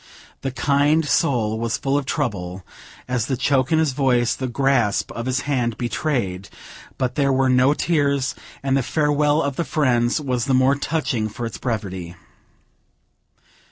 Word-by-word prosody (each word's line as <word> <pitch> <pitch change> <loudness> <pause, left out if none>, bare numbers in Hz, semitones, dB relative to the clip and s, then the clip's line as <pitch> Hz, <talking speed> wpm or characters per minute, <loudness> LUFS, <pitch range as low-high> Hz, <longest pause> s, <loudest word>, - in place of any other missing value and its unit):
The 135 - -2
kind 145 +4 +2
soul 110 -6 +1
was 115 0 -1
full 135 0 -1
of 145 -2 -1
trouble, 95 -11 -3 0.4
as 125 -2 -1
the 130 - -1
choke 130 +1 +1
in 160 - +4
his 160 -3 +2
voice, 125 -3 +2
the 130 - -4
grasp 125 -4 +1
of 115 +1 -5
his 130 +1 0
hand, 125 -6 -1
betrayed; 115 -6 -2 0.5
but 130 -2 -1
there 140 0 +1
were 130 0 +2
no 130 +3 +4
tears, 140 -6 +1 0.3
and 135 -1 +1
the 135 - +2
farewell 150 +2 +1
of 140 -2 -3
the 170 - +1
friends 125 -4 +1
was 130 -5 -1
the 135 -2 +2
more 130 +1 +4
touching 140 -7 -1
for 120 +3 -5
its 115 - -6
brevity. 95 -7 -4
130 Hz, 160 wpm, -22 LUFS, 120-140 Hz, 0.5 s, in